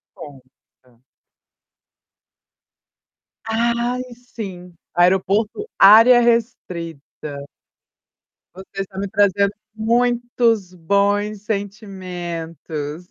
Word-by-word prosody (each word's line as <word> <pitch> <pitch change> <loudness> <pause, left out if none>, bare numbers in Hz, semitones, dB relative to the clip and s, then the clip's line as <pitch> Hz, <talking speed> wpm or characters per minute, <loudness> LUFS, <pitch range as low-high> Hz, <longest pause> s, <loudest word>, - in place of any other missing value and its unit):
Conta. 130 -3 -16 2.4
Ai, 235 +2 0
sim, 195 -7 -9 0.2
Aeroporto 195 - +2
área 225 +5 +8
restrita. 170 - -3 1.1
Você 190 +1 -7
está 190 0 -7
me 200 - -2
trazendo 200 0 +2 0.2
muitos 235 -3 +1
bons 200 +3 0
sentimentos. 175 -6 -5
200 Hz, 60 wpm, -20 LUFS, 175-225 Hz, 2.4 s, área